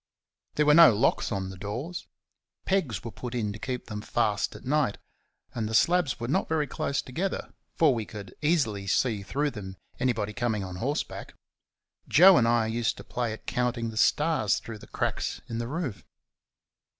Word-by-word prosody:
There 150 - +3
were 150 - +6
no 160 -8 +8
locks 120 +3 +1
on 95 -2 -2
the 95 - -10
doors: 120 - -5 0.6
pegs 175 - 0
were 115 - -6
put 125 +1 -7
in 105 -4 -1
to 110 - -9
keep 125 0 -4
them 105 -2 -6
fast 105 -2 0
at - - -11
night; 140 -5 +1 0.6
and 110 -2 -2
the 110 - -1
slabs 175 0 +3
were 120 - -3
not 185 +10 0
very 160 -2 +1
close 140 -1 -2
together, 180 +10 -3 0.2
for 155 -4 +4
we 110 -3 -3
could 100 -4 -9
easily 130 - +1
see 110 0 +1
through 145 +9 -1
them 95 -5 -8 0.2
anybody 110 -5 0
coming 110 -3 -1
on 90 -1 -6
horseback. 140 - -3 0.7
Joe 185 +4 +8
and 115 - +4
I 115 -1 +3
used 115 +1 -1
to - - -9
play 120 -2 -2
at 110 - -8
counting 120 -2 -1
the - - -10
stars 150 -3 +2
through 115 -2 -8
the - - -13
cracks - - -2
in 115 - -4
the 115 - -3
roof. 130 - -4
120 Hz, 185 wpm, -27 LUFS, 105-145 Hz, 0.7 s, no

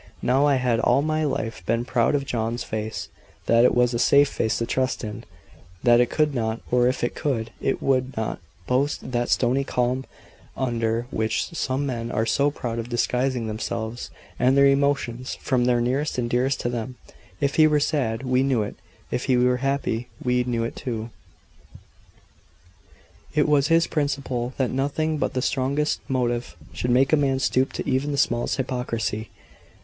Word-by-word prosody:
Now 135 +4 +3
I 140 - +4
had 125 -3 +1
all 130 +5 +3
my 155 0 0
life 115 -5 -3
been 115 +1 +1
proud 125 +1 +2
of 140 -1 -1
John's 115 -2 -2
face 105 -6 -4 0.4
that 115 0 +4
it 125 - +4
was 125 0 +3
a 120 - -1
safe 140 +3 +5
face 110 - -1
to 115 - -1
trust 130 +1 -1
in 110 +2 -6 0.6
that 120 0 +6
it 120 - +2
could 150 -2 +1
not, 115 -2 -1
or 125 0 +4
if 130 - -1
it 120 - 0
could, 115 -7 -2
it 135 - -1
would 130 -2 +1
not, 110 -1 -2 0.3
boast 130 +1 -1
that 120 -1 0
stony 130 +2 +2
calm 125 0 -1 0.5
under 115 -2 -1
which 110 - -1
some 135 -3 -1
men 120 -3 -3
are 110 - 0
so 140 +5 +2
proud 120 -5 -4
of 115 +1 -5
disguising 125 +1 0
themselves 110 +2 -4 0.3
and 130 +2 +3
their 140 - +6
emotions 140 -3 +1
from 125 -2 0
those 120 -1 +2
nearest 135 +5 -1
and 120 -1 -1
dearest 130 +2 +1
to 120 - -1
them. 120 +1 -4 0.4
If 140 0 0
he 155 -1 +7
were 150 -1 +3
sad, 130 -6 0
we 130 0 +2
knew 130 -5 +2
it; 100 - -7 0.3
if 125 - -2
he 130 -2 +3
were 125 0 +3
happy, 135 -3 -1
we 125 0 +1
knew 120 -2 -1
it 115 - -4
too. 115 -3 -5 2.2
It 150 0 +3
was 145 -2 +3
his 165 +1 +4
principle, 140 -4 -2
that 130 -2 0
nothing 145 +4 -1
but 140 - -1
the 130 - 0
strongest 140 +3 0
motive 120 -2 -1 0.2
should 125 - -2
make 130 +4 +3
a - - +9
man 140 -3 +1
stoop 130 0 +1
to - - -4
even 135 +2 0
the 140 - -2
smallest 120 -3 +1
hypocrisy. 120 -4 -2
125 Hz, 180 wpm, -24 LUFS, 120-140 Hz, 2.2 s, a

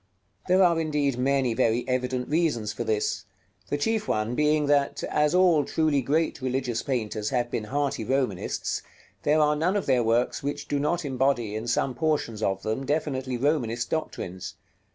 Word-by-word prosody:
§ - - -44 0.4
LIX. - - -24
There 185 +1 +5
are 170 -2 +4
indeed 150 -4 0
many 135 -2 +2
very 115 +2 +1
evident 125 0 -1
reasons 145 -10 0
for - - -3
this; 105 -1 -1 0.4
the 145 - 0
chief 215 +7 0
one 110 +2 0
being 150 +2 +2
that, 140 -1 +1
as 150 +2 +1
all 175 -5 +5
truly 155 -2 +1
great 150 +4 0
religious 130 -2 -1
painters 110 -5 -2
have 120 -2 -1
been 110 - -2
hearty 140 -1 -1
Romanists, 125 -6 -1 0.4
there 150 +1 +3
are 150 0 +3
none 170 +6 +1
of 205 - 0
their 130 -3 +3
works 115 +2 +1
which 145 +1 -4
do 145 - 0
not 150 +3 0
embody, 130 -5 0
in 110 +2 -4
some 125 +2 +1
portions 125 -6 -1
of 95 -2 -1
them, 110 +5 -2
definitely 135 -3 -1
Romanist 120 -4 0
doctrines. 95 - -4
135 Hz, 175 wpm, -26 LUFS, 115-150 Hz, 0.4 s, There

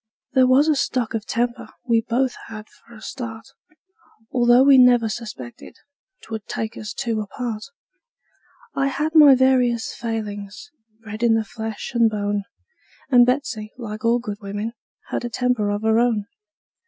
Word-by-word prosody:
There 260 -1 +5
was 265 +4 +4
a 310 - +3
stock 250 -4 -1
of 220 -1 -4
temper 240 +1 -2 0.2
we 230 -1 +3
both 250 +3 -1
had 215 -1 -9
for 235 - -19
a 215 - -13
start, 225 -2 -7 0.9
Although 245 0 +5
we 275 -1 +7
never 245 -2 +5
suspected 210 - -8 0.5
'twould 220 -2 -7
take 220 0 -4
us 215 -1 -6
two 225 -2 -2
apart; 215 +1 -5 1.1
I 275 0 0
had 300 +3 -2
my 295 -4 +8
various 250 -3 +2
failings, 210 +2 -6 0.3
bred 215 0 -8
in 235 -2 +4
the 220 -1 0
flesh 220 -1 -6
and 235 -2 +4
bone; 205 -1 -2 0.7
And 245 -1 +6
Betsey, 250 -5 -2
like 215 -3 -7
all 230 +1 +3
good 210 -4 -6
women, 205 +3 -4 0.4
had - - -3
a 240 - -3
temper 245 -3 0
of 205 +1 -2
her 220 +1 +3
own. 230 -4 +1
230 Hz, 155 wpm, -22 LUFS, 215-250 Hz, 1.1 s, my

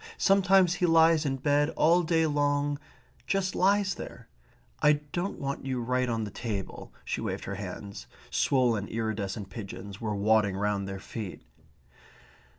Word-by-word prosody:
Sometimes 195 -2 +4
he 180 0 +1
lies 165 -1 +5
in 135 - 0
bed 145 +2 +2
all 170 +3 +5
day 160 -1 +2
long 145 -1 +1 0.5
just 195 -1 0
lies 200 +1 +3
there.... - - -9 0.5
I 150 - +6
don't 150 +6 -4
want 140 0 -4
you 130 -1 -1
right 125 +1 0
on 115 -1 -1
the 105 - -5
table"; 105 -3 -5
she - - -2
waved - - -3
her 100 - -4
hands. 100 - -7 0.2
Swollen 120 -6 +2
iridescent 105 -3 -3
pigeons 100 -1 -8
were 105 -2 -2
waddling 100 -1 +2
round 100 -1 -1
their 95 0 -5
feet. 100 -2 -7
130 Hz, 150 wpm, -28 LUFS, 105-160 Hz, 0.5 s, I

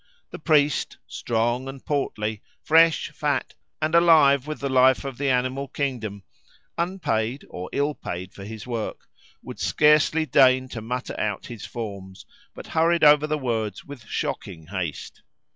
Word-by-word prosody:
The - - -8
priest, 150 -3 +2
strong 120 +2 -1
and 135 0 -9
portly, 110 -7 -2 0.2
fresh, 165 -1 +4
fat, 150 -1 -2 0.3
and 155 +1 -1
alive 155 -5 +5
with 155 - -5
the 140 - -2
life 130 0 +4
of 135 -2 -6
the 140 -1 0
animal 130 +2 0
kingdom, 115 -9 -4 0.5
unpaid, 145 -9 -2
or 90 +1 -6
ill 145 +2 0
paid 90 -7 -7
for 100 - -10
his 110 +1 -8
work, 115 -3 -5 0.4
would - - -9
scarcely 150 +1 +3
deign 130 -3 +4
to 115 - -6
mutter 125 +3 -4
out 105 -2 -2
his 115 -4 -8
forms, 100 -5 -7 0.3
but - - -9
hurried 165 +1 +1
over 150 0 +6
the 155 0 0
words 110 -7 -3
with 140 -5 -11
shocking 80 -1 -4
haste. 90 -3 -5
130 Hz, 150 wpm, -24 LUFS, 110-150 Hz, 0.5 s, over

